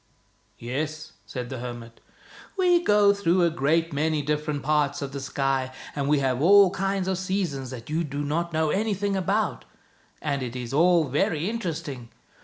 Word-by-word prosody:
" -, -, -40 dB
"Yes," 155 Hz, +6 st, -4 dB, 0.2 s
said 125 Hz, -2 st, -5 dB
the 130 Hz, -, -4 dB
hermit. 120 Hz, -1 st, -8 dB, 0.3 s
" -, -, -20 dB
We 355 Hz, -2 st, +4 dB
go 205 Hz, -5 st, +5 dB
through 185 Hz, -2 st, +2 dB
a 170 Hz, -, +3 dB
great 165 Hz, +2 st, +1 dB
many 155 Hz, +1 st, 0 dB
different 150 Hz, 0 st, -2 dB
parts 150 Hz, +1 st, +1 dB
of 135 Hz, -, -5 dB
the 140 Hz, -, -5 dB
sky, 135 Hz, -1 st, -1 dB, 0.2 s
and 140 Hz, -1 st, -1 dB
we 150 Hz, -, +4 dB
have 130 Hz, -2 st, 0 dB
all 195 Hz, +2 st, +7 dB
kinds 195 Hz, 0 st, -1 dB
of 190 Hz, -1 st, -1 dB
seasons 185 Hz, -9 st, -2 dB
that 120 Hz, -2 st, -8 dB
you 160 Hz, +3 st, -1 dB
do 145 Hz, -1 st, -4 dB
not 170 Hz, +4 st, -1 dB
know 155 Hz, -1 st, +1 dB
anything 205 Hz, -1 st, 0 dB
about, 195 Hz, +1 st, 0 dB, 0.6 s
and 140 Hz, -2 st, -2 dB
it 125 Hz, -1 st, -5 dB
is 125 Hz, 0 st, -5 dB
all 170 Hz, +2 st, +4 dB
very 150 Hz, +4 st, 0 dB
interesting. 165 Hz, -, -4 dB
155 Hz, 180 wpm, -25 LUFS, 135-185 Hz, 0.6 s, all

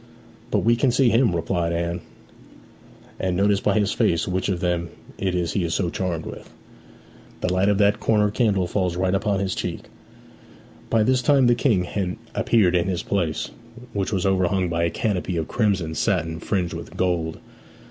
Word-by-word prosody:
'But -, -, +1 dB
we 120 Hz, +1 st, +4 dB
can 130 Hz, +3 st, +2 dB
see 125 Hz, 0 st, +3 dB
him,' 115 Hz, -6 st, +3 dB
replied 85 Hz, 0 st, -1 dB
Anne, 85 Hz, +1 st, -2 dB, 1.2 s
'and 90 Hz, -2 st, -1 dB
notice 100 Hz, 0 st, +3 dB
by -, -, +1 dB
his 105 Hz, -1 st, +2 dB
face 85 Hz, -1 st, +1 dB
which 95 Hz, +1 st, -1 dB
of 90 Hz, -3 st, -1 dB
them 90 Hz, -2 st, -1 dB, 0.3 s
it 95 Hz, -2 st, -1 dB
is 85 Hz, -2 st, -1 dB
he 95 Hz, -, 0 dB
is 85 Hz, -1 st, -1 dB
so 90 Hz, -4 st, 0 dB
charmed 90 Hz, -4 st, -3 dB
with. -, -, -9 dB, 0.9 s
The 90 Hz, -, 0 dB
light 95 Hz, +2 st, +2 dB
of 100 Hz, -, +2 dB
that 105 Hz, +1 st, +3 dB
corner 105 Hz, -2 st, +2 dB
candle 105 Hz, -5 st, +1 dB
falls 90 Hz, -1 st, -1 dB
right 90 Hz, +1 st, 0 dB
upon 100 Hz, 0 st, +1 dB
his 95 Hz, -2 st, -1 dB
cheek.' -, -, -5 dB, 1.0 s
By 115 Hz, -1 st, +3 dB
this 130 Hz, +2 st, +2 dB
time 135 Hz, +1 st, +4 dB
the 120 Hz, -, +5 dB
King 115 Hz, -6 st, +2 dB
had 90 Hz, 0 st, -3 dB, 0.2 s
appeared 95 Hz, -6 st, +3 dB
in 90 Hz, 0 st, +2 dB
his 90 Hz, -2 st, -2 dB
place, 85 Hz, -6 st, -1 dB, 0.4 s
which 100 Hz, -2 st, -1 dB
was 95 Hz, -3 st, 0 dB
overhung 95 Hz, -1 st, +1 dB
by 85 Hz, 0 st, 0 dB
a -, -, +1 dB
canopy 95 Hz, -2 st, -2 dB
of 80 Hz, -, -2 dB
crimson 95 Hz, -8 st, 0 dB
satin 80 Hz, -4 st, 0 dB
fringed 90 Hz, 0 st, -1 dB
with -, -, -8 dB
gold. 85 Hz, -3 st, -1 dB
95 Hz, 185 wpm, -23 LUFS, 85-105 Hz, 1.2 s, the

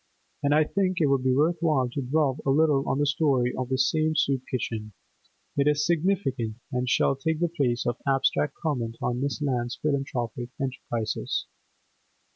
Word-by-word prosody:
And 145 Hz, -, +1 dB
I 155 Hz, -, +5 dB
think 185 Hz, +3 st, 0 dB
it 160 Hz, -, +4 dB
will 140 Hz, -1 st, +3 dB
be 130 Hz, 0 st, +1 dB
worth 155 Hz, +6 st, +2 dB
while 150 Hz, -6 st, +2 dB
to 140 Hz, +3 st, -3 dB
dwell 140 Hz, +1 st, +1 dB
a -, -, -1 dB
little 145 Hz, -1 st, +3 dB
on -, -, +1 dB
the 145 Hz, -, +2 dB
story 140 Hz, -4 st, +2 dB
of 130 Hz, -1 st, -3 dB
this 130 Hz, 0 st, +2 dB
same 155 Hz, 0 st, +1 dB
soup 140 Hz, -3 st, +2 dB
kitchen; 110 Hz, -4 st, -3 dB, 0.6 s
it 140 Hz, 0 st, +2 dB
is 150 Hz, 0 st, +2 dB
significant, 160 Hz, -, 0 dB, 0.2 s
and 125 Hz, -1 st, -1 dB
shall 135 Hz, -, +3 dB
take 155 Hz, +4 st, -1 dB
the 175 Hz, -, +2 dB
place 125 Hz, -7 st, 0 dB
of 120 Hz, +1 st, 0 dB
abstract 135 Hz, +1 st, +2 dB
comment 120 Hz, -8 st, -2 dB
on 125 Hz, +1 st, -1 dB
Miss 140 Hz, +2 st, -2 dB
Lant's 125 Hz, -3 st, -1 dB
philanthropic 130 Hz, -5 st, -2 dB
enterprises. 125 Hz, -4 st, -2 dB
135 Hz, 175 wpm, -26 LUFS, 125-155 Hz, 0.6 s, I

